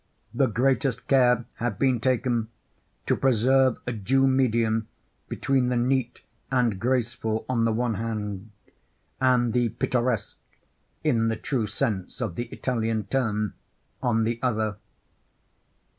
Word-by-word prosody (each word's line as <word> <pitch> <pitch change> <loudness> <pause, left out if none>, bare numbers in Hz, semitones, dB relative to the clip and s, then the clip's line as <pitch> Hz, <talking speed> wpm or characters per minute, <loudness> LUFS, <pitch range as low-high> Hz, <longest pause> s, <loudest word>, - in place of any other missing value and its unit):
The 130 +2 +3
greatest 130 +3 0
care 125 -3 +4
had 120 -3 -2
been 130 -3 +2
taken 120 -2 0 0.6
to - - +2
preserve 130 +1 +3
a 125 - -2
due 130 +6 +2
medium 115 -4 +2 0.4
between 130 -2 +1
the 125 - 0
neat 125 0 0 0.3
and 120 -7 +1
graceful 115 -2 -1
on 115 -3 +1
the 115 - +2
one 120 +1 0
hand, 105 -2 -4 0.7
and 125 -3 +3
the 120 -1 +2
pittoresque, 120 -1 -1 0.7
in 115 -1 +2
the 110 - 0
true 125 -5 -1
sense 105 -4 -2
of 110 -8 -2
the 120 - -3
Italian 115 -3 -2
term, 105 -2 -1 0.5
on 115 -2 +2
the 115 +1 -1
other. 110 -5 0
120 Hz, 130 wpm, -26 LUFS, 110-130 Hz, 0.7 s, care